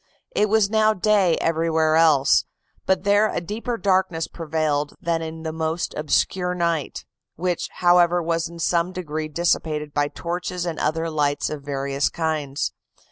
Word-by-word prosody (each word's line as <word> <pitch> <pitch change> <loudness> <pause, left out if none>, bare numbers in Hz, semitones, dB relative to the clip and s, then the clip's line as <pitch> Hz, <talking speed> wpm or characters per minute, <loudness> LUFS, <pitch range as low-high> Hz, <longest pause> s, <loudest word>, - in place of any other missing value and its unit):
It 210 - +2
was 220 -1 +4
now 215 0 +3
day 195 -3 +3
everywhere 160 -1 +1
else, 155 -4 +4 0.4
but 190 -1 +2
there 205 +1 +3
a - - -1
deeper 220 +7 -4
darkness 185 -4 +1
prevailed 155 -3 -2
than 165 -1 -1
in 160 0 -6
the 160 - -3
most 160 +1 -2
obscure 180 +4 0
night; 170 -4 -2 0.3
which, 180 +1 -2
however, 175 0 +4
was 165 0 -1
in 170 - -11
some 170 +2 0
degree 155 -4 -4
dissipated 155 -2 -1
by 145 0 +1
torches 180 +3 -4
and 165 -2 -3
other 165 +2 0
lights 145 -1 0
of 150 -2 -5
various 140 0 -1
kinds. 155 -4 -2
165 Hz, 150 wpm, -23 LUFS, 155-180 Hz, 0.4 s, was